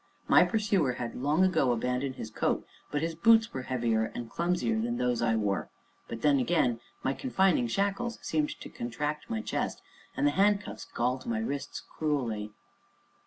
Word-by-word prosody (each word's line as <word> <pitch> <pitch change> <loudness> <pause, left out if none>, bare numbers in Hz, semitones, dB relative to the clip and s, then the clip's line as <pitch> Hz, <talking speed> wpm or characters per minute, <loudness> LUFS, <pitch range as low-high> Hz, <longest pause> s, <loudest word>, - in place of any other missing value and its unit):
My - - +7
pursuer 200 - +1
had 120 -1 -4
long 150 +7 +2
ago 160 -9 +3
abandoned 125 +3 -1
his 110 - -7
coat, - - 0 0.2
but 150 +1 -1
his 165 0 -1
boots 225 +6 +4
were 130 - -3
heavier 120 -3 0
and 120 -1 -6
clumsier 180 +6 0
than 240 +1 -1
those 125 -1 0
I 115 -1 +2
wore; 105 -3 -1 0.4
but 115 -1 -7
then, 145 -2 +5
again, 125 -5 +2 0.2
my 135 - +1
confining 190 - +2
shackles 200 - -1
seemed 155 -2 -1
to - - -7
contract 145 - -4
my 225 -1 -1
chest; - - -2 0.3
and 290 - +2
the 295 - +4
handcuffs 200 +1 +1
galled 125 - -1
my 235 -1 0
wrists 180 -11 -3
cruelly. 120 -9 -2
145 Hz, 165 wpm, -29 LUFS, 120-200 Hz, 0.4 s, My